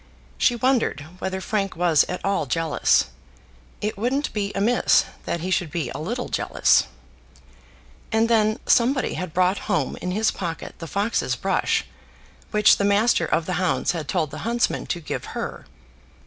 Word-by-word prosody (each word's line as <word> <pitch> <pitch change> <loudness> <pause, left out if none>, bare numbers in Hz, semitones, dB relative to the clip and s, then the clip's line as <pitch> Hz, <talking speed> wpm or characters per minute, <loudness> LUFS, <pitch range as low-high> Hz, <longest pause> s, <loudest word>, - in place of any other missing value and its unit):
She 245 - +3
wondered 250 - +1 0.2
whether 190 0 -3
Frank 195 0 -2
was 165 -3 +3
at 180 - -5
all 195 -7 0
jealous. 160 - +2 0.7
It 210 -1 -3
wouldn't 265 +6 -1
be 205 -2 -2
amiss 225 +5 +3 0.2
that 170 - -2
he 185 +2 -3
should 175 -3 +1
be 165 0 -3
a - - -6
little 240 +11 -3
jealous. - - +2 1.2
And 225 +1 +3
then 215 -1 +2
somebody 255 +2 +2
had 180 -2 -4
brought 185 +3 +2
home 165 -9 0
in 180 - -4
his 215 +4 +1
pocket 170 -3 -5
the 165 - -6
fox's 200 +7 0
brush, - - 0 0.6
which 210 -1 +5
the - - -1
master 200 -3 +3
of 160 - 0
the 185 - -2
hounds 185 - +1
had 165 -4 -5
told 160 -4 -1
the 155 - -7
huntsman 235 +5 -1
to 175 - -2
give 155 - -5
her. - - -5
195 Hz, 160 wpm, -23 LUFS, 170-225 Hz, 1.2 s, which